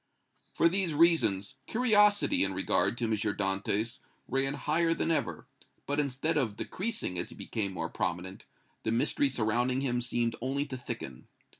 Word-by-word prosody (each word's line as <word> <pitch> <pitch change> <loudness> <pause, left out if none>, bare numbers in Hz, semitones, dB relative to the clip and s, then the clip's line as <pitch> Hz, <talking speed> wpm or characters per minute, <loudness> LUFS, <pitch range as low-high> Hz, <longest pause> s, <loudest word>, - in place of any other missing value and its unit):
For 165 - +4
these 180 -2 0
reasons 145 - +3
curiosity 210 - +4
in 95 -1 0
regard 95 +4 +1
to 120 - -3
M. 115 - 0
Dantès 105 +2 -1 0.3
ran 135 +1 0
higher 165 +4 +1
than 165 - 0
ever, 160 - -1 0.4
but 145 +1 -1
instead 145 +3 0
of 110 -8 0
decreasing 195 - -3
as - - -3
he - - -11
became 100 -3 -3
more 80 -3 -3
prominent, 95 0 -3 0.4
the 110 - -1
mystery 125 +4 +2
surrounding 125 +2 +1
him 125 -3 0
seemed 120 -1 0
only 135 +3 -1
to 140 -3 -6
thicken. 115 - -7
125 Hz, 155 wpm, -30 LUFS, 105-155 Hz, 0.4 s, For